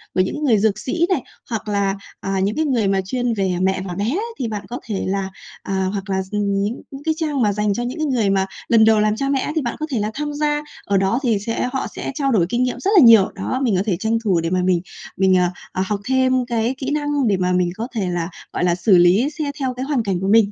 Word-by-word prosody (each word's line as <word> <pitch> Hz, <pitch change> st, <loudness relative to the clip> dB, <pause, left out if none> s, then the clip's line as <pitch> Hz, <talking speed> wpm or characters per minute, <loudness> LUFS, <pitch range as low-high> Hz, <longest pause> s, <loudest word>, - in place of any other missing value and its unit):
của 185 Hz, -, +4 dB
những 295 Hz, +11 st, -2 dB
người 240 Hz, -7 st, +4 dB
dược 210 Hz, 0 st, +1 dB
sĩ 330 Hz, +10 st, 0 dB
này, 340 Hz, -9 st, +1 dB, 0.3 s
hoặc 225 Hz, -2 st, -4 dB
là, 200 Hz, -1 st, 0 dB, 0.2 s
à, 195 Hz, 0 st, -2 dB
những 200 Hz, +3 st, 0 dB
cái 315 Hz, -, +1 dB
người 240 Hz, -8 st, +1 dB
mà 195 Hz, 0 st, +2 dB
chuyên 245 Hz, +3 st, -1 dB
về 195 Hz, -4 st, 0 dB
mẹ 190 Hz, 0 st, +1 dB
và 180 Hz, -, -4 dB
bé 200 Hz, +3 st, -2 dB
ấy, 275 Hz, -, 0 dB, 0.2 s
thì 250 Hz, -, -1 dB
bạn 210 Hz, -2 st, -5 dB
có 245 Hz, +2 st, -5 dB
thể 210 Hz, -4 st, -3 dB
là, 195 Hz, 0 st, -1 dB, 0.3 s
à 190 Hz, -1 st, -1 dB
hoặc 200 Hz, 0 st, -5 dB
là, 190 Hz, 0 st, 0 dB
ừm, 210 Hz, 0 st, 0 dB, 0.2 s
những 215 Hz, +4 st, -3 dB
những 275 Hz, +1 st, -9 dB
cái 315 Hz, -, +1 dB
trang 300 Hz, -4 st, -1 dB
mà 210 Hz, -3 st, +2 dB
dành 210 Hz, 0 st, 0 dB
cho 240 Hz, -, -2 dB
những 245 Hz, +6 st, -4 dB
cái 310 Hz, -, 0 dB
người 245 Hz, -8 st, +1 dB
mà 195 Hz, -1 st, +2 dB, 0.2 s
lần 230 Hz, -2 st, +5 dB
đầu 220 Hz, 0 st, +5 dB
làm 210 Hz, 0 st, +2 dB
cha 275 Hz, +4 st, -2 dB
mẹ 275 Hz, -1 st, +2 dB
ấy, 300 Hz, -, -3 dB
thì 315 Hz, -, +1 dB
bạn 240 Hz, -3 st, -3 dB
có 310 Hz, -, -1 dB
thể 245 Hz, -, 0 dB
là 210 Hz, +1 st, -1 dB
tham 295 Hz, +2 st, -3 dB
gia. 295 Hz, 0 st, 0 dB, 0.2 s
Ở 200 Hz, -, +2 dB
đó 195 Hz, +6 st, +1 dB
thì 230 Hz, -5 st, +2 dB
sẽ 230 Hz, +4 st, -2 dB
họ 265 Hz, -, -1 dB
sẽ -, -, -4 dB
trao 275 Hz, -3 st, 0 dB
đổi 195 Hz, -8 st, +3 dB
kinh 240 Hz, +4 st, +1 dB
nghiệm 250 Hz, -, -2 dB
rất 395 Hz, -, 0 dB
là 340 Hz, -, +9 dB
nhiều. 225 Hz, -5 st, +7 dB
Đó, 255 Hz, -, -2 dB
mình 230 Hz, -6 st, +2 dB
có 185 Hz, -, +1 dB
thể 195 Hz, -6 st, 0 dB
tranh 220 Hz, +2 st, +1 dB
thủ 190 Hz, -6 st, +2 dB
để 165 Hz, 0 st, -1 dB
mà 185 Hz, +1 st, +1 dB
mình 180 Hz, -2 st, +2 dB, 0.4 s
mình, 190 Hz, -1 st, +4 dB
à, 180 Hz, -1 st, +2 dB, 0.2 s
ờ, 185 Hz, -, -2 dB
học 205 Hz, +1 st, -2 dB
thêm 260 Hz, -1 st, +2 dB
cái 235 Hz, +1 st, -1 dB
kỹ 265 Hz, 0 st, -4 dB
năng 290 Hz, -3 st, 0 dB
để 200 Hz, -3 st, +2 dB
mà 180 Hz, 0 st, 0 dB
mình 180 Hz, -1 st, +2 dB
có 230 Hz, +2 st, -3 dB
thể 195 Hz, -5 st, -1 dB
là, 175 Hz, -1 st, -2 dB, 0.2 s
gọi -, -, -1 dB
là, 175 Hz, -1 st, +2 dB
xử 180 Hz, +2 st, +4 dB
lý 185 Hz, +10 st, +4 dB
xét 285 Hz, -2 st, -2 dB
theo 260 Hz, -2 st, -1 dB
cái 255 Hz, +1 st, -4 dB
hoàn 275 Hz, -5 st, 0 dB
cảnh 195 Hz, -4 st, -1 dB
của 190 Hz, -, -1 dB
mình. 210 Hz, 0 st, +4 dB
220 Hz, 290 wpm, -20 LUFS, 195-260 Hz, 0.4 s, là